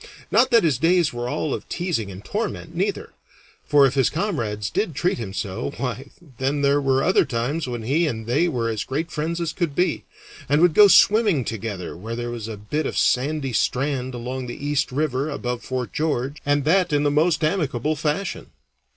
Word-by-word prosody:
Not 255 Hz, +3 st, +4 dB
that 235 Hz, -3 st, +5 dB
his 150 Hz, -7 st, +2 dB
days 170 Hz, -1 st, +3 dB
were 120 Hz, 0 st, -3 dB
all 150 Hz, -, -2 dB
of -, -, -6 dB
teasing 170 Hz, -, -2 dB
and 95 Hz, +1 st, -10 dB
torment, 205 Hz, -6 st, -4 dB
neither; 195 Hz, +3 st, -2 dB, 0.5 s
for 145 Hz, -2 st, +5 dB
if 135 Hz, -, +1 dB
his 135 Hz, -2 st, +3 dB
comrades 115 Hz, -, -2 dB
did 170 Hz, -9 st, -1 dB
treat 175 Hz, -2 st, 0 dB
him 105 Hz, -5 st, -5 dB
so, 100 Hz, +7 st, -4 dB
why, 130 Hz, +1 st, -4 dB, 0.3 s
then, 140 Hz, +2 st, 0 dB
there 140 Hz, +1 st, +3 dB
were 135 Hz, -1 st, +2 dB
other 185 Hz, -, +4 dB
times 135 Hz, +3 st, -2 dB
when 120 Hz, -2 st, -4 dB
he 155 Hz, +8 st, +1 dB
and 110 Hz, -5 st, -4 dB
they 140 Hz, +9 st, +2 dB
were 120 Hz, -8 st, -1 dB
as 110 Hz, -1 st, -2 dB
great 160 Hz, +6 st, -3 dB
friends 165 Hz, +3 st, -2 dB
as 170 Hz, -2 st, -2 dB
could 165 Hz, -6 st, -2 dB
be, 180 Hz, -1 st, 0 dB, 0.5 s
and 145 Hz, +1 st, +3 dB
would 175 Hz, -1 st, +5 dB
go 210 Hz, -, +8 dB
in -, -, +5 dB
swimming 205 Hz, -, +5 dB
together 105 Hz, -5 st, -5 dB
where 110 Hz, +7 st, -6 dB
there 120 Hz, 0 st, -4 dB
was 115 Hz, -2 st, -5 dB
a 110 Hz, -2 st, -6 dB
bit 150 Hz, +10 st, -2 dB
of -, -, -4 dB
sandy 135 Hz, 0 st, +1 dB
strand 130 Hz, +2 st, -1 dB
along 125 Hz, +2 st, -5 dB
the 120 Hz, +4 st, -7 dB
East 145 Hz, -1 st, 0 dB
River 140 Hz, 0 st, -1 dB
above 125 Hz, -4 st, -3 dB
Fort 125 Hz, -4 st, -4 dB
George, 145 Hz, -2 st, -1 dB
and 145 Hz, -1 st, +2 dB
that 180 Hz, +2 st, +3 dB
in 145 Hz, 0 st, +2 dB
the 145 Hz, -, +2 dB
most 160 Hz, +2 st, +2 dB
amicable 155 Hz, -4 st, 0 dB
fashion. 150 Hz, +6 st, -2 dB
140 Hz, 205 wpm, -23 LUFS, 120-165 Hz, 0.5 s, go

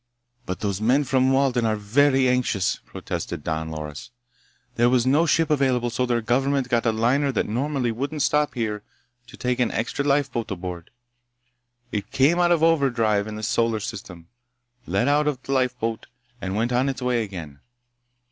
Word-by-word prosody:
"But 90 Hz, -, -4 dB
those 100 Hz, -1 st, -2 dB
men 130 Hz, +6 st, +3 dB
from 130 Hz, -1 st, +2 dB
Walden 135 Hz, -3 st, +2 dB
are 110 Hz, -1 st, +1 dB
very 130 Hz, +6 st, +3 dB
anxious!" 125 Hz, -7 st, +1 dB
protested 75 Hz, -, -5 dB
Don 80 Hz, -1 st, -3 dB
Loris. 75 Hz, -4 st, -7 dB, 0.6 s
"There 120 Hz, 0 st, +3 dB
was 125 Hz, -1 st, +2 dB
no 150 Hz, +6 st, +3 dB
ship 160 Hz, +1 st, +2 dB
available, 130 Hz, -4 st, +1 dB
so 125 Hz, +2 st, -1 dB
their 120 Hz, -1 st, +1 dB
government 135 Hz, +3 st, 0 dB
got 120 Hz, -1 st, +1 dB
a -, -, +4 dB
liner 125 Hz, +6 st, +1 dB
that 115 Hz, -, -1 dB
normally 130 Hz, +2 st, -1 dB
wouldn't 140 Hz, +5 st, -2 dB
stop 150 Hz, -1 st, +1 dB
here 110 Hz, -3 st, -2 dB, 0.5 s
to 130 Hz, -, -13 dB
take 125 Hz, 0 st, -1 dB
an 125 Hz, -, +2 dB
extra 120 Hz, +5 st, -2 dB
lifeboat 140 Hz, -5 st, 0 dB
aboard. 90 Hz, -2 st, -6 dB, 1.0 s
It 105 Hz, -2 st, -3 dB
came 150 Hz, +6 st, +3 dB
out 175 Hz, 0 st, +3 dB
of 165 Hz, -2 st, +3 dB
overdrive 120 Hz, -10 st, +2 dB
in 110 Hz, -, -6 dB
this 110 Hz, 0 st, -3 dB
solar 115 Hz, -2 st, +1 dB
system, 95 Hz, -6 st, -8 dB, 0.6 s
let 120 Hz, -, +1 dB
out 145 Hz, -2 st, +1 dB
the -, -, -6 dB
lifeboat, 125 Hz, -4 st, -1 dB, 0.3 s
and 95 Hz, 0 st, -3 dB
went 115 Hz, +3 st, 0 dB
on 130 Hz, +3 st, +2 dB
its 130 Hz, -1 st, -4 dB
way 125 Hz, -2 st, +1 dB
again. 85 Hz, -9 st, -7 dB
125 Hz, 170 wpm, -24 LUFS, 110-135 Hz, 1.0 s, a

